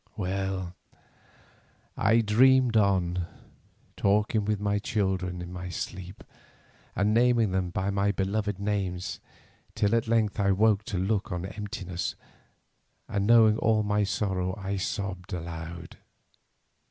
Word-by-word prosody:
Well, 95 -2 -2 1.2
I 110 +3 +3
dreamed 125 +3 +4
on, 90 -4 +2 0.7
talking 105 +1 +1
with 105 -1 0
my 105 0 0
children 95 -5 -1
in 90 +1 -8
my 90 0 -6
sleep 95 +1 -6 0.7
and 100 +3 +2
naming 120 -3 +3
them 95 -1 0
by 95 +2 -1
their 100 +1 +1
beloved 100 +1 -1
names, 100 -3 -2 0.6
till 105 +1 +1
at 115 -1 +1
length 110 -3 +1
I 100 -1 +3
woke 105 +1 +3
to 105 -6 -3
look 100 +2 -1
on 90 0 -3
emptiness, 95 -3 -5 0.9
and 100 -1 -1
knowing 110 -2 +6
all 110 -1 +2
my 105 0 +1
sorrow 95 -2 -1
I 100 0 -3
sobbed 95 -1 -4
aloud. 85 -1 -7
100 Hz, 125 wpm, -27 LUFS, 95-105 Hz, 1.2 s, knowing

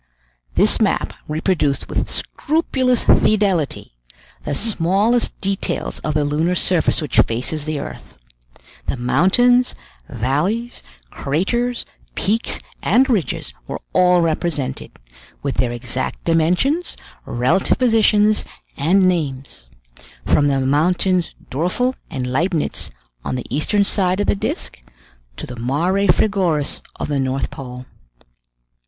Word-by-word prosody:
This - - +5
map - - +1
reproduced 155 -2 0
with - - -2
scrupulous 260 -5 0
fidelity 195 - +2 0.5
the 145 - -2
smallest 210 - +1
details 195 0 -2
of 155 - -3
the 150 -1 +2
lunar 160 +5 +1
surface 175 -3 +1
which 145 - +1
faces 130 +6 0
the 155 -1 -2
earth; 65 - -8 0.7
the - - -1
mountains, 205 - +3 0.3
valleys, 150 - -1 0.3
craters, 235 - -1 0.3
peaks, 225 +4 +2 0.2
and 265 +1 +3
ridges 200 -9 -1
were - - -5
all 180 -1 +4
represented, 160 -4 -2 0.5
with 140 -1 -2
their 125 -2 +1
exact 120 +2 -3
dimensions, 180 - +1 0.3
relative 130 +11 +1
positions, 215 -3 +3 0.3
and 185 +6 +3
names; 140 - -2 0.6
from 145 - +3
the 135 -1 +1
mountains 170 +6 +1 0.2
Doerfel 180 - 0 0.2
and 130 -6 -3
Leibnitz 155 +6 -1 0.3
on - - -3
the 125 - -4
eastern 200 +7 +2
side 190 -2 0
of 205 - +1
the - - +2
disc, 195 - -4 0.6
to - - -5
the 125 - -9
Mare 170 +12 0
frigoris 180 -9 +1
of - - -4
the 145 -2 -1
North 130 0 -1
Pole. 125 -1 -8
170 Hz, 115 wpm, -20 LUFS, 140-205 Hz, 0.7 s, This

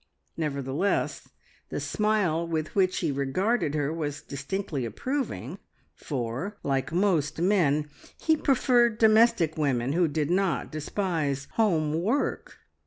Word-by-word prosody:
Nevertheless 145 +3 -1 0.4
the - - -3
smile 205 -7 0
with 155 -2 -2
which 185 -2 +2
he 165 -4 0
regarded 150 - 0
her 145 0 0
was 150 -3 -4
distinctly 140 +1 -4
approving, 260 - -3 0.3
for, 135 - -4
like 135 0 -1
most 170 -5 +1
men, 160 -6 +2 0.3
he 320 - +3
preferred 245 -5 +3
domestic 220 -8 +4
women 135 -3 +1
who 175 +1 +3
did 150 +1 -1
not 180 -7 0
despise 155 -3 -2
home 165 -8 +1
work. 235 +10 -1
165 Hz, 115 wpm, -27 LUFS, 145-200 Hz, 0.4 s, domestic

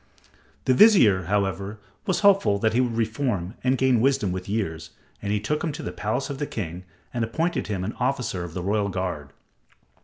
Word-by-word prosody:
The 130 - +4
vizier, 120 - +6
however, 100 +1 -1 0.3
was 190 - +1
hopeful 195 - +4
that 110 +2 +1
he 125 - +3
would 120 -3 -1
reform 110 -5 -1
and 130 +1 +2
gain 130 -3 +3
wisdom 135 -7 +2
with 90 +1 -5
years, 95 -7 -2 0.3
and 100 - -2
he 105 - +1
took 150 +9 -2
him 165 - 0
to - - -7
the - - -4
palace 110 +7 -2
of 135 - -6
the 145 - -2
king 90 -3 -5 0.3
and 120 -2 -1
appointed 160 +10 -1
him 95 -4 -2
an 110 - -3
officer 125 -8 -1
of 85 -1 -8
the 90 - -3
royal 100 +1 0
guard. 90 -6 -3
110 Hz, 195 wpm, -25 LUFS, 95-130 Hz, 0.3 s, vizier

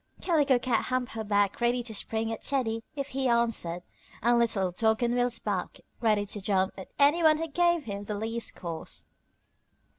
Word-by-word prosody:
Calico 295 -7 +3
Cat 240 -2 0
humped 255 -1 -1
her 220 -1 -4
back 205 0 +1
ready 240 +1 +2
to 230 -2 -4
spring 225 +2 -1
at 225 - -7
Teddy 235 -5 -1
if 280 -1 -4
he 265 0 -1
answered, 230 -8 +1 0.4
and 240 +1 +4
Little 195 -6 +1
Dog 220 +5 +1
on 240 0 +1
wheels 245 -1 +1
barked, 200 -5 -3 0.2
ready 215 -3 +2
to 205 0 -5
jump 190 -1 +1
at 190 - -9
any 290 +4 +4
one 310 -1 +5
who 325 +1 -3
gave 345 +1 +2
him 200 -4 -5
the 210 - -3
least 225 +2 -3
cause. 165 -3 -6
230 Hz, 185 wpm, -28 LUFS, 205-255 Hz, 0.4 s, one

